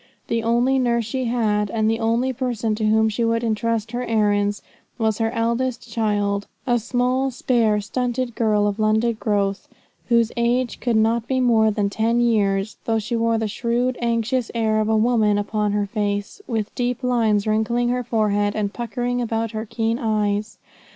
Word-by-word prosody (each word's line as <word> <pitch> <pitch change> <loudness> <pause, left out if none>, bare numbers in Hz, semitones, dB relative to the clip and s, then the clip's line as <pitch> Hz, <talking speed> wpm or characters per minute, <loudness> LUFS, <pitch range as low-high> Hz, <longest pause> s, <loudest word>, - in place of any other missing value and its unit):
The 230 0 0
only 240 +4 +2
nurse 235 -2 +1
she 255 +4 -2
had, 215 -4 0
and 220 0 0
the 225 +1 +1
only 235 +3 +1
person 235 -3 -2
to 215 0 -2
whom 220 +1 +3
she 220 +2 -1
would 230 0 +1
entrust 225 0 -1
her 245 +1 -3
errands, 205 -3 +1 0.3
was 220 -3 0
her 225 0 +1
eldest 235 +1 -1
child, 205 -2 0 0.2
a 240 -2 +2
small, 250 +3 0
spare, 235 -4 +1
stunted 245 +2 -2
girl 215 -2 +1
of 205 +1 -1
London 220 +2 +2
growth, 200 -2 -1 0.4
whose 235 -1 +3
age 240 +1 0
could 240 -2 0
not 225 +1 +2
be 260 -1 0
more 225 -3 +4
than 205 -1 0
ten 230 +3 +1
years, 205 -3 +1
though 225 -1 +1
she 220 +2 -2
wore 230 0 +1
the 220 -1 -1
shrewd, 240 +4 -1
anxious 235 +1 0
air 220 -1 +1
of 215 - -1
a 220 - +3
woman 215 -2 +3
upon 210 0 -1
her 205 0 +1
face, 205 - -3
with 220 -4 -2
deep 245 +1 -2
lines 225 -5 +2
wrinkling 225 +3 +1
her 250 0 0
forehead 205 -2 0
and 205 -2 -2
puckering 245 +1 -2
about 225 -1 -2
her 220 0 -5
keen 225 +2 -1
eyes. 210 -1 -1
225 Hz, 175 wpm, -22 LUFS, 215-240 Hz, 0.4 s, more